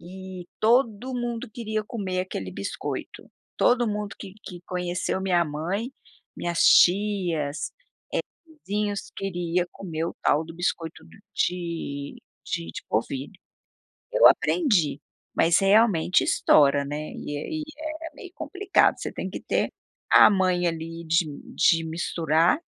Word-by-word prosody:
E, 185 +1 -9
todo 235 +1 +2
mundo 240 0 -3
queria 215 -1 -3
comer 195 -5 -3
aquele 95 - -5
biscoito. 100 +2 -6 0.3
Todo 245 -1 +3
mundo 210 -1 -3
que 195 -2 -9
que 175 -1 -9
conheceu 180 +1 -2
minha 180 -3 +2
mãe, 175 - -3 0.4
minhas 170 -1 -2
tias, 180 -6 +3 0.4
eh, - - +1 0.5
vizinhos, 205 0 -2
queria 175 -2 -1
comer 165 -4 -4
o - - -5
tal 155 +2 +2
do 165 - -10
biscoito 165 -2 -3 0.3
de 165 -5 -3 0.3
de 85 - -3
de - - -7
polvilho. 130 - -2 0.8
Eu - - +6
aprendi. 185 - +3 0.4
Mas, 165 0 +4
realmente, 195 -4 +4
estoura, 140 -1 +4
né, 150 +2 -5
e 145 - -5
aí, 315 - -4 0.4
é 330 - -10
meio 370 - -10
complicado. 380 +6 +1
Você - - -4
tem - - -4
que - - -6
ter - - 0 0.4
a - - +9
manha, 185 -3 +2
ali, 165 +1 -7
de 165 +1 +2 0.3
de 165 -1 +4
misturar. 165 - +1
180 Hz, 130 wpm, -25 LUFS, 165-210 Hz, 0.8 s, a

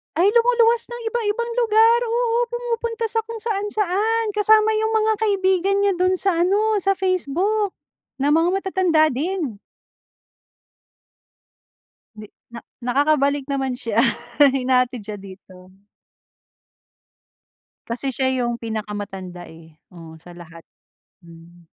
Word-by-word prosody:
Ay 375 +5 +3
lumuluwas 470 0 +3
ng 480 0 -8
iba-ibang 470 0 -2
lugar. 455 +1 +4
Oo, 470 0 0
pumupunta 470 -1 -3
sa 450 - +1
kung 455 -1 -7
saan-saan. 420 +1 -1
Kasama 430 +1 +3
'yung 440 0 0
mga 435 0 +2
kaibigan 390 -2 +1
niya 400 -1 +2
dun 365 +1 +2
sa 370 -2 0
ano 420 +3 +1
sa 390 +1 +1
Facebook, 375 +3 -1 0.5
na 290 +1 +2
mga 325 +3 +3
matatanda 345 -5 +2
din. 300 - -3 2.6
Di 215 -1 -10 0.3
na 235 - -7 0.3
nakakabalik 280 +1 +1
naman 270 -2 -1
siya, 240 -3 -2 0.5
hinahatid 255 -2 0
siya 210 0 -7
dito. 185 -1 -14 2.2
Kasi 250 +4 -2
siya 260 +1 -1
'yung 240 -2 -2
pinakamatanda 205 -5 -6
eh. 160 -1 -16 0.2
Oo, 160 -1 -12
sa 175 +2 -14
lahat. 165 -1 -13 0.6
Hmm. 170 +1 -17
360 Hz, 115 wpm, -21 LUFS, -, 2.6 s, lugar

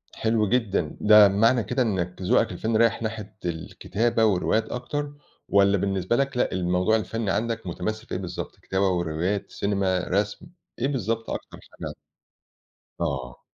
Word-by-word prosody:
حلو 110 -2 +1
جدًا، 100 -9 0
ده 105 -1 +8
معنى 115 +5 +3
كده 120 +6 -1
إنّك 95 -6 -1
ذوقك 100 +7 +2
الفنّي 110 0 -1
رايح 115 0 +3
ناحية 110 -2 -5
الكتابة 110 +7 0
والروايات 110 +2 +1
أكتر، 145 +4 -4 0.4
والّا 100 0 +4
بالنسبة 95 +2 0
لك 140 0 0
لأ، - - +1
الموضوع 90 +3 +1
الفنّي 110 -1 -1
عندك 115 0 -2
متمثل 110 +6 -3
في - - -27
إيه 90 - -2
بالضبط، 90 - -6
كتابة 95 +1 +1
وروايات، 90 +2 -1
سينما، 100 -2 0
رسم 105 - -1 0.3
إيه 125 - +1
بالضبط 115 -4 -2
أكتر - - -6
حاجة؟ - - -7 1.1
آه. 65 -7 -3
105 Hz, 145 wpm, -25 LUFS, 95-115 Hz, 1.1 s, ده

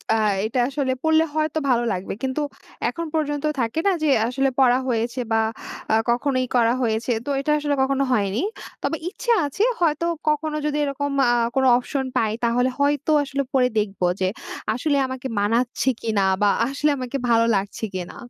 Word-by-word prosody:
আ - - +2 0.3
এটা 235 +3 -1
আসলে 270 -2 -1
পড়লে 320 0 +4
হয়তো 310 0 0
ভালো 240 -2 +3
লাগবে। 185 +1 -4
কিন্তু 265 +3 -1 0.5
এখন 335 0 -5
পর্যন্ত 295 -2 -1 0.2
থাকে 235 +5 -1
না? - - +5
যে 310 - +3 0.2
আসলে 270 +2 +1
পরা 250 -2 +5
হয়েছে 235 +1 -1
বা 225 0 +3 0.5
আ - - +5
কখনো 255 +3 +1
ই - - -11
করা 235 -1 +4
হয়েছে। 225 +1 0
তো - - -5
এটা 275 +2 -1
আসলে 290 -1 0
কখনো 275 +1 +1
হয়নি। 200 -1 0 0.4
তবে 325 - 0
ইচ্ছে 475 - -8 0.2
আছে 290 +9 -1 0.2
হয়তো 330 0 +2 0.2
কখনো 305 0 -1
যদি 300 0 0
এরকম 285 0 -2 0.2
আ - - +3 0.2
কোনো 265 -1 +3
অপশন 265 +2 -3
পাই 220 -1 +1
তাহলে 245 +2 +2
হয়তো 290 +1 +1
আসলে 275 0 -2
পরে 255 -2 +4
দেখব 200 -2 -4 0.2
যে 185 - +3 0.5
আসলে 285 +5 0
আমাকে 260 0 -5
মানাচ্ছে 235 +5 +1
কিনা 215 -3 0 0.2
বা 205 - +5 0.2
আসলে 280 +3 0
আমাকে 255 +1 -3
ভালো 230 0 +4
লাগছে 200 +3 -2
কিনা। 180 -2 -5
260 Hz, 175 wpm, -23 LUFS, 230-290 Hz, 0.5 s, না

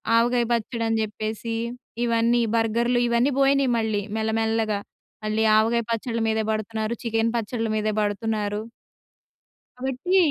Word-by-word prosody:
ఆవకాయ 240 +1 +3
పచ్చడి 230 +1 -2
అని 225 0 +1
చెప్పేసి, 215 +2 -4 0.5
ఇవన్నీ 235 +1 +2
బర్గర్లు, 235 +2 +2
ఇవన్నీ 235 +4 +2
పోయినాయి 275 -1 +3
మళ్ళీ 220 -2 0 0.2
మెల్లమెల్లగా. 220 -1 0 0.5
మళ్ళీ 215 +1 +1
ఆవకాయ 230 +2 +2
పచ్చడ్ల 230 0 -1
మీదే 220 0 0
బడుతున్నారు. 220 +1 -2
చికెన్ 225 0 +1
పచ్చళ్ళ 225 +1 -2
మీద 215 0 0
బడుతున్నారు. 210 0 -1 1.2
కాబట్టి 265 +9 -1
225 Hz, 115 wpm, -24 LUFS, 220-235 Hz, 1.2 s, ఆవకాయ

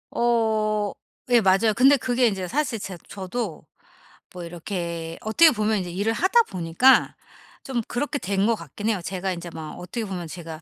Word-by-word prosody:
어. 220 -3 +1 0.4
예. 240 -1 +6
맞아요. 195 +3 +3
근데 265 +4 +6
그게 245 0 +1
이제 190 -4 -2
사실 270 +1 -1
제 190 -2 -6
저도 195 -1 -5 0.7
뭐 180 -1 -7
이렇게 170 -1 -5
어떻게 315 +10 +5
보면 215 -3 0
이제 180 -2 -4
일을 200 +6 -1
하다 385 - +4
보니까 185 - +3 0.5
좀 255 -3 -2
그렇게 290 +4 -2
된 195 -1 0
것 230 - +3
같긴 185 +3 -7
해요. 210 -5 0
제가 185 +2 -3
인제 175 0 -7
막 155 -1 -7
어떻게 220 +6 -5
보면 180 -4 -5
제가 160 -1 -8
205 Hz, 315 characters per minute, -24 LUFS, 175-235 Hz, 0.7 s, 예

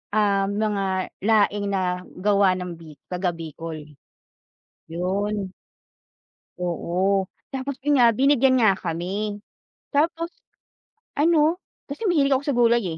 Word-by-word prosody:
ah, 200 -2 +2
mga 200 -3 -1
laing 205 -1 +2
na 180 -2 -1 0.2
gawa 200 -1 +3
ng 180 -1 -5
bi 155 -3 -13
taga-Bicol. 165 -3 -4 1.1
Yun. 195 +3 -2 1.1
Oo, 180 +2 0 0.2
tapos 270 0 -4
yun 290 -2 +3
nga, 235 -2 +5
binigyan 270 0 +4
nga 195 -3 +4
kami, 195 +5 -3 0.5
tapos 335 +3 0 0.8
ano, 320 +3 +3 0.3
kasi 295 +10 -5
mahilig 280 -5 +3
ako 265 - 0
sa 285 - +1
gulay, 235 -2 +4
205 Hz, 105 wpm, -24 LUFS, 180-265 Hz, 1.1 s, nga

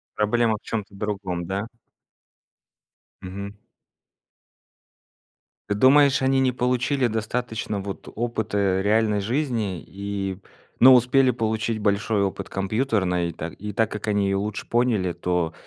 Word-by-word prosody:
Проблема 110 +1 +2
в - - -20
чём-то 105 -3 -4
другом, 95 -4 -3
да? 100 +3 -3 1.5
Мгм. 100 +2 -7 2.2
Ты 105 - +1
думаешь, 135 +3 +5
они 135 0 +3
не 130 - +3
получили 125 +2 +1
достаточно, 110 -1 -3
вот, 100 0 -7
опыта 105 -4 0
реальной 105 0 +2
жизни 115 - -2
и 100 -1 -4 0.4
но 130 +1 +9
успели 125 +1 +4
получить 110 -1 -1
большой 105 0 +1
опыт 95 - -3
компьютерной, 95 -4 0
и - - -4
та 80 - -5
и 105 +4 -7
так 110 +2 +1
как 105 0 -5
они 100 -1 +1
её 95 0 +1
лучше 105 -1 -4
поняли, 115 -7 +1
то 90 -2 -1
105 Hz, 125 wpm, -24 LUFS, 100-120 Hz, 2.2 s, но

